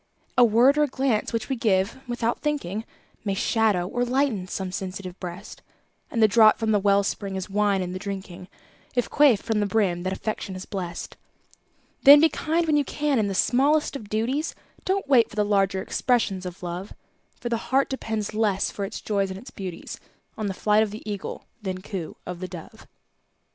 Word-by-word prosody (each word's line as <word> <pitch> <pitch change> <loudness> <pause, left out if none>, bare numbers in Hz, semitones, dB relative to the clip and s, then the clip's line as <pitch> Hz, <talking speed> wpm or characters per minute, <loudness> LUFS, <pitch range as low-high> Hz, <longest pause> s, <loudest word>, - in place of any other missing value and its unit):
A 250 - +6
word 240 +6 +5
or - - +5
a - - -4
glance 260 -5 0
which 230 -2 -2
we 270 - -1
give 205 -1 +1
"without 240 -1 -1
thinking", 225 - -2 0.4
May 200 -2 -1
shadow 210 -4 +1
or 245 +5 -1
lighten 245 -6 0
some 185 0 -4
sensitive 185 -1 -6
breast; 180 +2 -8 0.5
And 230 - +1
the - - +8
draught 215 0 +6
from 220 -1 0
the 210 - +4
well 200 0 +3
spring 195 0 -3
is 190 +1 -5
wine 200 -2 +2
in 180 0 -5
the 185 - -4
drinking, 190 -2 -6 0.5
If 245 - 0
quaffed 280 -8 +5
from 225 -2 0
the 205 - +1
brim 195 -5 +1
that 185 +1 -2
Affection 195 -1 -4
has 185 - -7
blest. 175 -4 -6 0.8
Then 285 +1 +10
be 320 +2 +5
kind 330 +2 0
when 305 -2 +3
you 290 - +3
can 290 -2 0
in 210 - +1
the 195 - -3
smallest 285 +9 +2
of 215 -7 -7
duties, 245 +9 -1 0.3
Don't 385 -3 0
wait 250 -5 +5
for - - -12
the 210 -1 +2
larger 195 -2 +1
expressions 205 -7 0
of 180 +1 -9
Love; 180 +3 -5 0.5
For 240 - -4
the 235 - +1
heart 270 +1 +3
depends 220 -5 -3
less 210 -3 +1
for 200 - -3
its 200 - -7
joys 200 -2 0
and 190 - -6
its 255 +6 -11
beauties 185 -4 -7 0.4
On 215 -2 -3
the 195 - -3
flight 210 +2 +3
of 220 - +1
the 215 +2 -9
Eagle 205 -2 -5 0.2
than 190 -2 -4
coo 185 -6 -6
of 180 -1 -6
the 185 - -4
Dove. 175 -3 -11
210 Hz, 200 wpm, -25 LUFS, 190-245 Hz, 0.8 s, Then